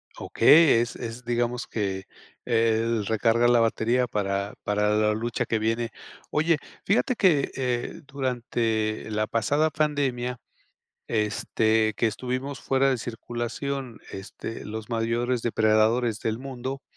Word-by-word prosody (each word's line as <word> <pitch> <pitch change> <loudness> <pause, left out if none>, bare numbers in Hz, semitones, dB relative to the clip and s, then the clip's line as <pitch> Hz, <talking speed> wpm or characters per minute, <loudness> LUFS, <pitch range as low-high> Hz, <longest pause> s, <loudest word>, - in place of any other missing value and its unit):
Okey, 155 -6 +5
es 120 +1 -2
es, 120 +1 -7
digamos 120 0 -1
que 95 -3 -3 0.4
el 115 -1 +1
recarga 115 +2 +2
la 120 0 +5
batería 115 +2 +2
para 100 -2 -2
para 105 0 +1
la 105 0 +3
lucha 115 +2 -2
que 110 - 0
viene. 115 +2 0 0.4
Oye, 160 +1 +2 0.3
fíjate 230 +5 +2
que, 165 -10 +3
eh, 125 -2 -2
durante 120 -6 -2
la 105 0 0
pasada 145 +8 +1
pandemia, 135 -5 -1 0.7
este, 110 0 +1
que 115 - +2
estuvimos 130 +5 -3
fuera 135 0 +2
de 130 - 0
circulación, 120 +2 -5
este, 95 +3 -7
los 110 0 -6
mayores 115 +2 0
depredadores 110 0 +2
del 110 0 -2
mundo, 130 0 -6
120 Hz, 125 wpm, -26 LUFS, 110-130 Hz, 0.7 s, Okey